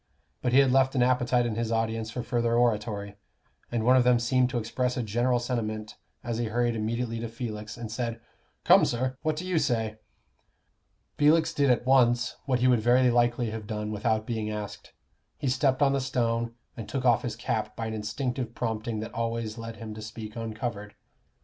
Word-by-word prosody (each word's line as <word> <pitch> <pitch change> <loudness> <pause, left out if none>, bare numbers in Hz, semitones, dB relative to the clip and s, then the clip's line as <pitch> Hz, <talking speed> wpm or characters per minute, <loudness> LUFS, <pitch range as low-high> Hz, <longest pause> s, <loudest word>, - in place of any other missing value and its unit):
But 125 - 0
he 130 - +4
had 135 -2 +5
left 130 +1 +3
an 125 - +4
appetite 125 -1 +2
in 115 - -1
his 115 +1 -2
audience 115 -1 -1
for 120 +1 -4
further 120 -2 0
oratory, 105 -4 0 0.5
and 115 -2 -1
one 125 +1 +6
of 130 - +5
them 125 0 +5
seemed 125 +1 +2
to 130 - -2
express 125 +2 -1
a 125 - 0
general 120 +3 +1
sentiment 110 -3 -3 0.3
as 120 -1 -3
he 120 - 0
hurried 120 +1 0
immediately 115 +1 -2
to 115 - -3
Felix, 110 -2 -6
and 115 -2 -6
said, 115 0 -3 0.4
"Come, - - +7
sir, 130 +2 0
what 155 -1 0
do 170 +4 -5
you 180 -3 +1
say?" 115 -6 -1 1.2
Felix 160 +2 +4
did 140 -3 +2
at 125 0 +2
once 125 -2 +3
what 130 -2 +1
he 130 - +4
would 125 -3 +4
very 125 +2 +4
likely 120 -1 +2
have 110 -1 -6
done 105 -1 -3
without 110 +1 0
being 110 -2 -2
asked 105 -1 -6 0.5
he 145 - -3
stepped 130 +1 +2
on 135 -1 +4
the 140 - +1
stone, 115 -3 -1 0.2
and 115 - -7
took 135 -2 -2
off 120 -2 +4
his 115 -3 -4
cap 110 -1 -2
by 115 - -4
an 110 - -3
instinctive 115 +3 -3
prompting 110 -1 -2
that 110 - -7
always 115 -1 -3
led 115 0 -6
him 110 -1 -7
to 110 - -8
speak 110 0 -8
uncovered. 110 -2 -5
120 Hz, 200 wpm, -27 LUFS, 110-125 Hz, 1.2 s, Come